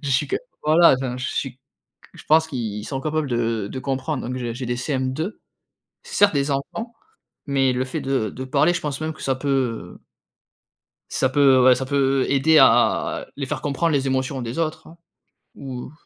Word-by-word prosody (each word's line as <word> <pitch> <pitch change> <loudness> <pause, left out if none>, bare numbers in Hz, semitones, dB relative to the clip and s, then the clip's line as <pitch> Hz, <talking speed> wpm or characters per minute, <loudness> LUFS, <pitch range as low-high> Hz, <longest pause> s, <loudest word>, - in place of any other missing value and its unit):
je 140 - -4
suis 135 +3 +2
q - - -1 0.3
voilà, 160 0 +6
enfin 125 -2 -3
je 125 - -3
suis 135 - -3
q - - -46 0.6
je - - -13
pense 160 +1 +4
qu'ils 110 -7 -4
sont 135 -2 -4
capables 155 -1 -2
de 115 -3 -1
de 130 - -5
comprendre. 135 0 -3
Donc 125 - -3
j'ai 120 -2 -4
j'ai 125 +2 -5
des 120 0 -2
CM2, 130 - -2 0.7
c'est 485 0 -10
certes 205 -5 +5
des 140 +1 0
enfants, 185 - -4 0.5
mais 135 -2 +2
le 125 +1 -1
fait 155 +4 -4
de 135 -5 0
de 130 - -7
parler, 145 +6 +2
je - - -2
pense 145 -1 -3
même 155 0 -2
que - - -12
ça 135 - 0
peut, 140 +2 -4
heu 120 -10 -2 1.1
ça 130 - +1
peut 135 -2 +5
ouais, 130 0 +7
ça 130 +2 -3
peut 135 -1 +1
aider 155 +3 +4
à, - - +4
heu, - - -26
les 140 - -4
faire 135 -1 -4
comprendre 150 +4 0
les 135 -1 +1
émotions 130 0 -1
des 120 +6 -5
autres, 155 -1 -3
hein. 165 +2 -15 0.6
Ou 130 -2 -7
135 Hz, 205 wpm, -22 LUFS, 130-150 Hz, 1.1 s, ouais